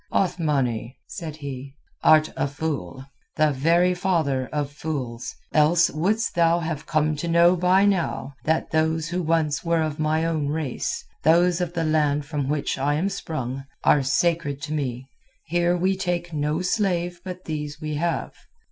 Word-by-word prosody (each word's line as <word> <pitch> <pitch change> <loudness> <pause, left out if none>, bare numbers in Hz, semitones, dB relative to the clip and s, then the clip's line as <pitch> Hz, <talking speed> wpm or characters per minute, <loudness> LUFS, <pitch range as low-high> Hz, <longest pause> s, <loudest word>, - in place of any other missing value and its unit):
"Othmani," 135 - 0
said 160 -4 -7
he, 140 -2 -7 0.3
"art 155 0 +5
a 135 - 0
fool, 140 - -4 0.3
the 155 -1 +3
very 170 +6 +3
father 160 -8 0
of 145 -1 -2
fools, 135 -6 -5 0.2
else 160 +3 +4
wouldst 210 +9 0
thou 170 0 +3
have 160 -3 -4
come 155 0 +1
to 170 - -3
know 170 +2 +5
by 180 +3 +4
now 175 -8 0
that 160 +1 0
those 160 0 +1
who 180 +1 -1
once 160 -3 0
were 165 -1 +2
of 155 -1 -3
my 155 +1 +1
own 160 -3 0
race, 150 -3 -3 0.2
those 175 +3 +4
of 175 -1 -2
the 170 -2 -1
land 150 -2 +1
from 145 -3 -3
which 145 -2 -1
I 145 +2 +1
am 180 +6 0
sprung, 135 -8 -4 0.2
are 145 - +5
sacred 145 +1 0
to 150 - -3
me. 130 -4 -3 0.4
Here 175 +2 +1
we 190 +2 +1
take 175 -2 -2
no 150 +3 -1
slave 180 -3 0
but 185 -1 -7
these 150 -1 -4
we 155 -1 -4
have. 170 +2 -1
155 Hz, 165 wpm, -24 LUFS, 145-175 Hz, 0.4 s, art